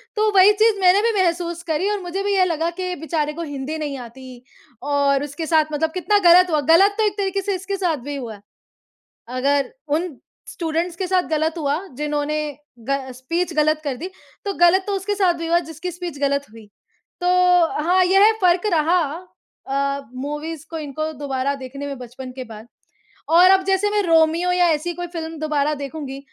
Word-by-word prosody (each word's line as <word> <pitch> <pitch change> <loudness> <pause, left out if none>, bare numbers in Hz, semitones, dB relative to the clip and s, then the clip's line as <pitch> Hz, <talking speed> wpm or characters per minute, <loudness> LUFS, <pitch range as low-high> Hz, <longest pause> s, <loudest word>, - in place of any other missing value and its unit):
तो 430 0 +2
वही 385 +2 +8
चीज़ 430 -1 +2
मैंने 375 +2 +5
भी 465 - +2
महसूस 340 -1 -1
करी 325 +6 0
और 415 -1 -1
मुझे 370 +3 -4
भी 405 - 0
ये 370 -1 +4
लगा 330 -1 -1
कि 365 -1 -2
बेचारे 305 -1 -2
को 335 - -6
हिंदी 290 +1 -5
नहीं 290 -3 -4
आती 250 0 -11 0.4
और 280 -1 +1
उसके 295 +3 -5
साथ 315 -1 +3
मतलब 320 +2 0
कितना 410 +3 +2
गलत 360 +1 +7
हुआ, 305 -2 +1
गलत 360 +7 +5
तो 440 - +2
एक 410 0 -4
तरीके 395 0 -1
से 395 0 -2
इसके 385 +2 -4
साथ 350 -5 0
भी 290 - -4
हुआ 235 -5 -6
है। 200 - -17 0.9
अगर 275 - 0 0.2
उन 315 -1 -1 0.3
स्टूडेंट्स 335 +1 -3
के 375 - -2
साथ 370 0 +2
गलत 315 +1 0
हुआ 290 0 0 0.2
जिन्होंने 300 0 -1 0.5
ग 275 0 +1
स्पीच 330 +8 -3
गलत 310 0 +2
कर 270 -3 -2
दी, 355 - -6 0.4
तो 400 - -1
गलत 350 +2 +4
तो 410 - -2
उसके 410 +2 -2
साथ 375 -4 +2
भी 330 0 -5
हुआ 340 +1 +3
जिसकी 335 +4 -5
स्पीच 345 -4 -7
गलत 280 0 +1
हुई। 220 -1 -14 0.5
तो 355 - -2 0.6
हाँ, 365 +3 +3
यह 390 +4 +5
फ़र्क 360 +2 +3
रहा 335 +2 +3 0.7
अ, 275 +1 -1
मूवीज़ 295 +4 -5
को 325 - -4
इनको 310 +1 -4
दोबारा 280 -1 -2
देखने 275 +2 -7
में 280 -1 -5
बचपन 255 +1 -9
के 260 - -7
बाद। 220 -1 -11 0.6
और 355 +3 +7
अब 380 -1 +4
जैसे 390 +1 +1
मैं 415 0 +1
रोमियो 330 +1 +3
या 360 0 +3
ऐसी 330 +3 -1
कोई 350 0 -5
फ़िल्म 325 -1 -5
दोबारा 300 -1 0
देखूँगी, 280 -1 -6
320 Hz, 195 wpm, -21 LUFS, 285-365 Hz, 0.9 s, वही